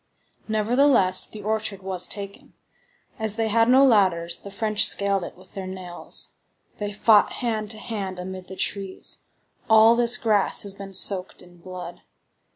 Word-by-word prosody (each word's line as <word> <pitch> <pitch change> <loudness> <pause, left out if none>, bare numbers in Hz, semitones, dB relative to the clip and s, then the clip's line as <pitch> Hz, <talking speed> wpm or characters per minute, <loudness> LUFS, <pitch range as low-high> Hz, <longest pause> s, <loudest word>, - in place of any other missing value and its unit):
Nevertheless, 220 -3 +2
the 210 -1 -11
orchard 215 -2 -3
was 185 -2 -1
taken. 200 -1 -8 0.6
As 220 -1 -1
they 225 -1 -1
had 230 +2 +3
no 265 +2 +6
ladders, 180 -8 +2
the 200 - -11
French 215 +1 0
scaled 200 -2 +5
it - - -9
with 185 0 -19
their 190 -1 -6
nails. 185 -2 -5 0.5
They 205 -1 -4
fought 210 +1 +3
hand 220 -4 -3
to 220 - -9
hand 205 -5 -5
amid 185 0 -8
the 190 - -9
trees. 195 -1 -3 0.4
All 220 +1 +6
this 240 0 +3
grass 210 -3 +1
has 200 -1 -4
been 195 -1 -10
soaked 190 0 +2
in 175 0 -19
blood. 180 -1 -10
200 Hz, 160 wpm, -23 LUFS, 185-220 Hz, 0.6 s, no